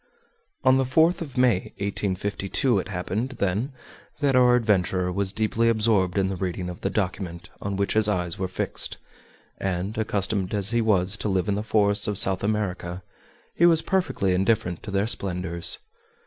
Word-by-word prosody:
On 130 0 +5
the - - +3
4th 160 +7 +3
of 145 -7 -7
May, 120 -7 +2
1852, 100 +3 -1
it - - -5
happened, 100 +7 -3
then, 100 +8 -1 0.5
that 140 -3 +2
our 125 -1 +6
adventurer 95 -5 +1
was 95 +1 -1
deeply 110 +2 +1
absorbed 105 -5 +2
in 95 -1 +2
the 95 - -3
reading 90 -1 -3
of 90 - -8
the 95 - -1
document 95 -4 -3
on 100 0 -3
which 100 0 0
his 110 -1 +3
eyes 90 -4 -2
were 95 - -1
fixed, 90 -1 -3 0.6
and, 95 +2 -2
accustomed 100 -2 -1
as 100 +1 +1
he 120 0 +2
was 100 -2 +2
to 105 - -2
live 95 0 0
in 100 - +1
the 100 - -1
forests 105 -2 +2
of 105 -2 +1
South 95 -1 +4
America, 95 -4 -2 0.5
he 170 - +4
was 165 -2 +4
perfectly 180 - 0
indifferent 90 -2 0
to - - -8
their 100 +1 +1
splendors. 90 -5 -1
100 Hz, 175 wpm, -25 LUFS, 95-110 Hz, 0.6 s, our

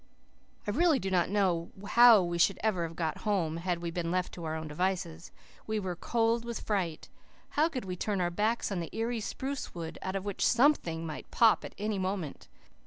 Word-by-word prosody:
I 205 - -1
really 320 +5 +4
do 195 -6 -3
not 175 -2 +2
know 185 -4 +1 0.2
how 235 -4 +8
we 170 0 -2
should 195 +3 +4
ever 185 -6 +1
have 165 - -11
got 160 -3 -2
home, 180 -7 0
had 175 0 -2
we 170 - -2
been 170 0 -2
left 180 +1 -1
to 170 - -7
our 160 0 -2
own 160 0 -5
devices. 170 +1 -2 0.4
We 220 0 0
were 185 -3 -3
cold 230 +4 +1
with 235 -1 -5
fright. 185 -7 -2 0.4
How 310 +3 +2
could 255 -9 -5
we 185 -1 -4
turn 200 +2 -1
our 175 -1 0
backs 215 +5 0
on 190 - -1
the 165 - -4
eerie 230 +1 -1
spruce 265 +4 -4
wood, 165 -2 -6
out 190 +1 -3
of 195 0 -3
which 200 -2 -2
SOMETHING 230 - +3
might 155 -2 -7
pop 225 -2 +4
at - - -8
any 210 -1 -2
moment? 185 -5 -3
190 Hz, 210 wpm, -30 LUFS, 170-220 Hz, 0.4 s, how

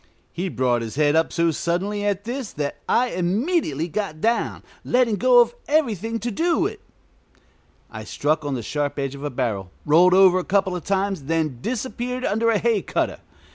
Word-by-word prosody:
He 185 +2 -3
brought 125 -5 0
his 115 +1 -6
head 150 0 +3
up 160 0 +2
so 170 -1 +2
suddenly 190 +6 -2
at 205 -1 -1
this 245 0 -5
that 145 -1 -3
I 250 +1 +3
immediately 180 - 0
got 180 -3 -4
down, 230 +6 0 0.2
letting 245 -4 +2
go 245 +4 +6
of 240 0 +1
everything 230 - 0
to 240 - -2
do 335 - +1
it. - - -4 1.1
I - - -7
struck 155 +1 -1
on 145 -2 -2
the 120 - -4
sharp 145 +4 -2
edge 135 -1 -2
of 140 0 -9
a 145 - -2
barrel, 115 -8 -2 0.2
rolled 175 +5 +5
over 185 -1 +6
a - - -3
couple 190 -1 +1
of 175 - -5
times, 195 -5 -1
then 155 -5 -1
disappeared 250 - -3
under 225 +2 +1
a 225 - +3
hay 225 -2 +1
cutter. - - -2
185 Hz, 185 wpm, -23 LUFS, 150-230 Hz, 1.1 s, go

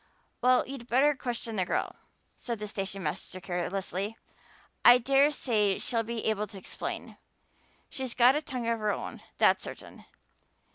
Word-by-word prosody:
"Well, 250 +1 +4
you'd 260 -3 -8
better 270 +5 +4
question 235 -4 -4
the 185 - +3
girl," - - -1 0.4
said 235 -2 -4
the 210 0 -5
station 195 -1 -4
master 155 +4 -4
carelessly. 190 +3 -3 0.7
"I 245 0 +10
dare 275 +3 +4
say 215 -9 +1
she'll 230 -2 -1
be 230 0 -4
able 215 -1 0
to 205 - -10
explain 190 - -6 0.7
she's 260 -3 -5
got 250 +1 +6
a 300 - +1
tongue 255 -6 -4
of 230 -1 0
her 215 -1 +1
own, - - -5 0.2
that's - - +4
certain. - - -9
230 Hz, 155 wpm, -29 LUFS, 200-255 Hz, 0.7 s, I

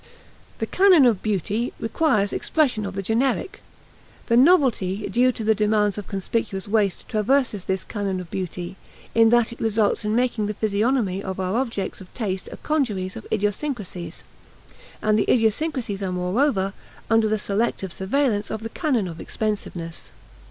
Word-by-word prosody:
The - - -1
canon 370 -7 +5
of 225 -6 +3
beauty 215 +3 -1
requires 225 -4 +1
expression 250 -10 +1
of 195 - -7
the 195 - -3
generic. 245 - 0 0.7
The 230 - +4
"novelty" 245 - +3
due 250 +2 +4
to 230 - -6
the 220 +1 +4
demands 210 -1 +2
of 210 - -6
conspicuous 195 0 -3
waste 205 -3 0
traverses 220 -2 +1
this 190 0 -1
canon 200 -3 -3
of 180 -2 -9
beauty, 180 0 -5 0.4
in 225 0 +6
that 235 0 +3
it - - -14
results 220 -2 +1
in 210 +1 0
making 235 -4 +1
the 210 - -3
physiognomy 210 -1 +1
of 190 -1 -5
our 185 +2 -1
objects 230 -7 -2
of 185 - -13
taste 190 -6 -3
a - - -8
congeries 210 -12 -1
of 225 - -9
idiosyncrasies; 205 - -3 0.8
and 215 0 +3
the - - +2
idiosyncrasies 225 -2 0
are, 190 -2 -2
moreover, 195 +2 +1 0.3
under 225 -1 +3
the 215 - +1
selective 200 -3 -1
surveillance 210 0 0
of 220 0 -4
the 225 - -4
canon 250 - 0
of 165 -2 -7
expensiveness. 185 -6 -4
215 Hz, 160 wpm, -23 LUFS, 195-240 Hz, 0.8 s, in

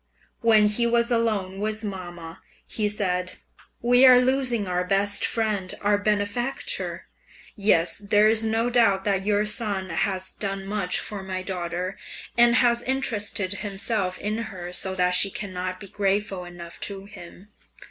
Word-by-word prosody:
When 220 -2 +5
he 235 +3 +1
was 235 0 +1
alone 210 -5 0
with 215 +1 -2
mamma, 175 -5 -7 0.3
he 210 -2 -1
said, 185 -3 -1 0.5
"We 245 +2 +5
are 255 -1 +9
losing 250 -4 +1
our 180 0 0
best 200 +2 +2
friend, 210 -5 -1
our 205 0 +2
benefactor. 210 +5 -1 0.5
Yes, 195 -5 +2
there 205 +1 +3
is 220 0 +3
no 225 +2 0
doubt 215 -6 +3
that 195 -1 -1
your 210 0 +2
son 205 -4 -1
has 185 +3 0
done 195 -1 -4
much 195 -2 -1
for 205 -2 -6
my 185 -1 -5
daughter, 180 0 -4 0.4
and 240 0 +5
has 240 -1 +3
interested 210 -7 -1
himself 200 -2 -2
in 215 +2 -3
her 180 -2 -8
so 190 +1 -2
that 180 -1 +2
she 195 +2 +7
cannot 185 -2 -5
be 200 - -10
grateful 195 -1 -1
enough 175 -1 -10
to 195 -1 -6
him." 200 -1 -13
205 Hz, 150 wpm, -24 LUFS, 185-220 Hz, 0.5 s, are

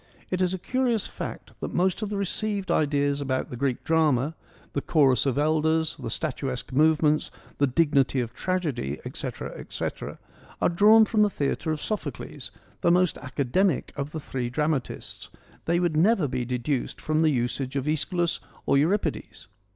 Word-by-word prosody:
It 185 0 0
is 180 -1 +2
a 190 - -1
curious 240 +1 0
fact - - -6
that - - -5
most 185 +3 +1
of 215 - -2
the 205 - -2
received 200 0 -1
ideas 145 -1 +1
about 130 -2 -2
the - - -4
Greek 130 0 -1
drama; 155 -3 +2 0.4
the 140 - 0
chorus 140 -4 +3
of 135 - 0
elders, 160 +1 +2
the - - -4
statuesque 135 -5 -3
movements, 155 +1 +3 0.3
the 140 - +4
dignity 140 -1 +2
of 120 -2 -3
tragedy, 150 - -2
etc., - - -5
etc., - - -5 0.4
are - - +3
drawn 215 +5 +6
from 215 -1 +2
the 210 - +5
theatre 160 -1 -1
of 155 -1 -3
Sophocles, 215 - -4 0.3
the - - +3
most 180 0 +3
academic 140 +4 0
of 140 +1 -4
the 160 - -4
three 130 -4 -3
drama 150 +2 +1
tists: - - -8 0.4
they 170 +1 +2
would 175 -3 +1
never 180 0 +4
be 125 -1 -2
deduced 125 +2 -2
from 155 0 0
the 160 - +4
usage 130 0 -1
of 135 -1 -1
iEschylus 170 +3 0 0.3
or 140 - +4
Euripides. 170 - -1
155 Hz, 165 wpm, -26 LUFS, 135-180 Hz, 0.4 s, drawn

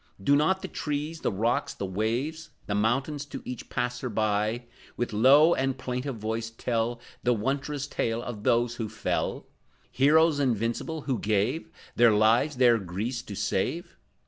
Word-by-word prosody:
Do 140 - +4
not 160 +6 +2
the - - -3
trees, 150 +2 -4
the - - 0
rocks, 120 +8 0
the 100 - -4
waves, 120 - -2 0.2
The 100 - -2
mountains, 135 +8 0
to 140 -2 -7
each 125 -1 -7
passer 125 +1 -2
by, 110 +2 0 0.3
With 120 -2 -2
low 140 +9 +6
and 135 0 0
plaintive 125 +1 -3
voice 110 +1 -3
tell 115 +1 -2 0.2
The 125 - +2
wondrous 140 +5 -2
tale 115 -4 -2
of 120 -5 -6
those 120 +2 +1
who 110 -2 -3
fell, 110 - -2 0.5
Heroes 155 +3 +4
invincible 125 +5 -1
who 135 -4 -2
gave 110 +10 0 0.3
Their 120 -2 +6
lives, 115 +8 +3
their 120 -2 +5
Greece 105 +7 -3
to 105 -4 -8
save? 165 - -2
120 Hz, 155 wpm, -27 LUFS, 110-140 Hz, 0.5 s, low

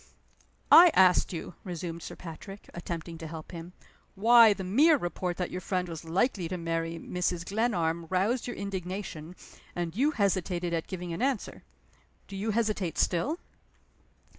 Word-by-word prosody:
"I 350 +1 +10
asked 185 -1 +5
you," 175 0 -6
resumed 170 -2 -5
Sir - - -8
Patrick, 190 +4 -10
attempting 170 -1 -6
to 165 - -6
help 160 0 -8
him, 170 0 -8 0.4
"why 230 +2 +7
the 200 -1 -2
mere 290 - +5
report 175 -3 -3
that 180 - -3
your 180 - -4
friend 180 0 -2
was 165 -1 -7
likely 180 +2 0
to 180 - -4
marry 165 0 -2
Mrs. 175 0 -2
Glenarm 170 -7 0
roused 205 +8 0
your 245 - -4
indignation, 185 -3 -5 0.4
and 175 -1 -3
you 275 +7 +3
hesitated 185 - 0
at 165 -1 -2
giving 180 -2 -5
an 165 - -5
answer. 265 -4 -1 0.7
Do 200 - -9
you 205 +3 -2
hesitate 215 -6 -1
still?" 265 - +1
180 Hz, 155 wpm, -29 LUFS, 170-205 Hz, 0.7 s, I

